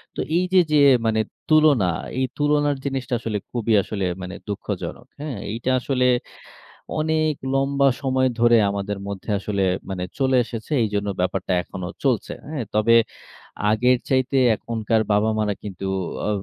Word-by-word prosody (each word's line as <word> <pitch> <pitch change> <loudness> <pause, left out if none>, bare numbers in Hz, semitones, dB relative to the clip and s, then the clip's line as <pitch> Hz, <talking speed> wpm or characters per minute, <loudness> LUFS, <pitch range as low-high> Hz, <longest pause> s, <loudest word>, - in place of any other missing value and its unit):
তো - - -7 0.2
এইযে 185 +1 +1
যে, 150 - +4 0.7
তুলনা, 155 -9 +5 0.3
এই 130 - +2
তুলনার 145 0 +2
জিনিসটা 135 -1 -3
আসলে 110 -2 -2
খুবই 115 -2 0
আসলে 100 -2 -3 0.2
মানে 90 +1 -6
দুঃখজনক। 100 - -5
হ্যাঁ? 145 -6 -5
এইটা 120 +3 -3
আসলে 125 0 0 1.0
অনেক 155 0 +1 0.2
লম্বা 140 0 +3
সময় 130 -1 +2
ধরে 120 0 +6
আমাদের 100 0 -3
মধ্যে 100 +2 -6
আসলে 100 0 -2 0.3
মানে 90 -2 -3
চলে 130 -1 +2
এসেছে। 115 +4 -7
এইজন্য 105 -1 -2
ব্যাপারটা 95 +1 -1
এখনো 95 -1 -7 0.2
চলছে। 125 -5 +1 0.2
হ্যাঁ? 150 -6 -3
তবে 110 +2 +4 0.8
আগের 125 +3 +3
চাইতে 130 0 +1 0.2
এখনকার 110 0 -1
বাবা-মারা 105 0 +1
কিন্তু 95 -2 -7 0.4
ও - - 0
120 Hz, 135 wpm, -22 LUFS, 105-135 Hz, 1.0 s, ধরে